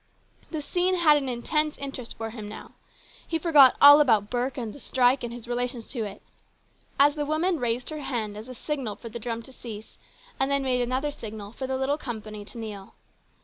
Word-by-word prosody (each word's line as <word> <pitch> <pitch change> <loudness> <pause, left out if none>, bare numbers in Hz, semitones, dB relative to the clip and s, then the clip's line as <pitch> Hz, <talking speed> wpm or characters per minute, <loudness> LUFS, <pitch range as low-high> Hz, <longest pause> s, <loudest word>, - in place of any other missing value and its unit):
The 310 -3 -4
scene 360 +5 +1
had 315 -4 +5
an 270 -2 -2
intense 300 +5 -1
interest 270 -4 -6
for 225 0 -4
him 215 -3 -7
now. 215 - -10 0.6
He 325 - 0
forgot 300 -6 +6
all 285 +1 +10
about 220 -7 +3
Burke 250 +2 -1
and 230 -4 -4
the - - -12
strike 255 0 +2
and 240 - -4
his 235 -1 -7
o - - -5
relations 245 -1 -2
to 235 -4 -3
it 200 - -9 0.8
as 285 +1 +6
the 295 -1 -2
woman 315 +3 0
raised 240 +2 -1
her 305 - -5
hand 225 -7 -3
as 215 +4 -9
a 255 - -8
signal 260 -5 -3
for 230 - -9
the 235 - -7
drum 230 0 -4
to 265 - -14
cease 220 -4 -10 0.4
and 270 +1 +2
then 280 0 +1
made 250 -2 +1
another 260 +4 -1
signal 210 -5 -8
for 260 +3 -5
the 265 0 -1
little 275 +3 0
company 215 -5 -6
to 235 - -12
kneel. 210 -4 -8
250 Hz, 215 wpm, -26 LUFS, 225-285 Hz, 0.8 s, all